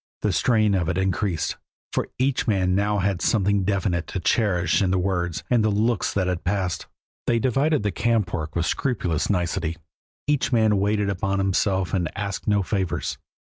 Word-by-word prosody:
The - - +1
strain 110 -4 +3
of 90 -3 +1
it 90 - -1
increased, 95 -3 -1 0.4
for - - 0
each 130 0 0
man 95 -4 +2
now 105 +2 +1
had 95 -2 0
something 100 -2 +2
definite 95 -3 0
to 95 - -4
cherish 90 -5 +2
in 95 - +2
the 95 - +2
words 90 -3 -1
and 120 -3 +3
the 110 - +3
looks 110 +2 +1
that 95 -2 +1
had 90 -2 -2
passed. 95 -2 -1 0.4
They 120 - +3
divided 135 +3 +1
the 105 - 0
camp 105 -1 0
work 80 -3 -3
with 85 -1 +1
scrupulous 90 - -1
nicety, 85 -3 -1 0.5
each 145 -2 +1
man 110 -4 +3
waited 105 0 +1
upon 95 +1 -1
himself 95 -1 +1
and 90 -5 0
asked 100 -2 -4
no 105 -2 +3
favors. 95 -4 -2
100 Hz, 180 wpm, -24 LUFS, 90-105 Hz, 0.5 s, strain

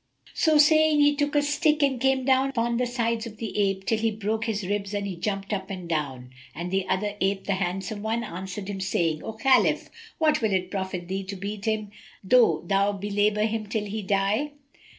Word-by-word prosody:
So 315 -2 +3
saying, 310 0 +5
he 290 0 +5
took 290 0 -1
a 290 - +4
stick[FN#270] 300 0 +2
and 265 -4 +1
came 265 -1 +2
down 265 0 +3
upon 235 -2 0
the 250 0 0
sides 230 -1 -1
of 220 -1 -11
the 220 -2 -5
ape, 195 -2 0
till 225 - +1
he 225 0 +2
broke 220 +1 -2
his 210 -4 -2
ribs 200 +1 -2
and 200 0 -2
he 195 -2 -4
jumped 195 +3 -3
up 190 -1 -3
and 185 -3 -6
down. 135 -6 -3 0.2
And 175 +2 -5
the 190 0 0
other 200 +2 0
ape, 195 0 +1
the 200 - 0
handsome 190 +2 -3
one, 225 +2 -1
answered 190 0 -6
him, 195 -2 -4
saying, 165 -5 0
"O 225 - -5
Khalif, 260 +4 +2 0.3
what 310 -3 +2
will 220 -3 +1
it 185 -1 -1
profit 190 -3 -4
thee 190 +2 -3
to 200 +1 -5
beat 200 +2 -5
him, 215 -2 -1 0.3
though 240 +4 +4
thou 200 +1 +2
belabour 205 +1 +1
him 220 -1 -2
till 210 0 -2
he 210 +2 -4
die?" 200 +9 0
210 Hz, 210 wpm, -26 LUFS, 195-235 Hz, 0.3 s, saying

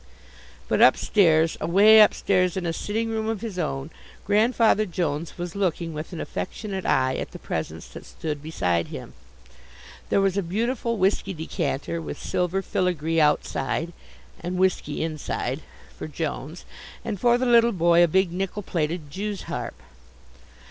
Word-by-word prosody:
But - - +1
upstairs, 165 -4 +4
away 210 +5 +6
upstairs 185 -3 +3
in 185 - -2
a 165 - -1
sitting 220 +6 -2
room 220 -1 -2
of 220 -3 -3
his 210 -6 -5
own 150 -2 -3 0.3
Grandfather 215 +1 +3
Jones 165 -3 -3
was 175 0 -5
looking 175 -4 -1
with 155 +3 -6
an 170 - -6
affectionate 195 -1 -4
eye 130 0 +2
at - - -4
the - - -7
presents - - -5
that - - -11
stood 150 -3 -5
beside 90 - -1
him. - - -8 1.0
There - - +3
was 195 -1 +1
a - - +2
beautiful 230 +6 -1
whisky 195 0 +1
decanter, 160 0 -3
with 160 - -6
silver 180 +2 -1
filigree 165 -4 0
outside 150 +2 0 0.5
(and 180 +1 -4
whiskey 180 -5 0
inside) 155 -3 -3 0.3
for - - -6
Jones, 155 +1 -5 0.4
and 215 -4 -3
for 240 +2 +4
the 255 - -1
little 235 -1 +5
boy 170 -3 +4
a - - +5
big 190 +2 +2
nickel 195 +3 -3
plated 160 -3 -2
Jew's 200 +3 -4
harp. - - -5
180 Hz, 150 wpm, -25 LUFS, 160-205 Hz, 1.0 s, away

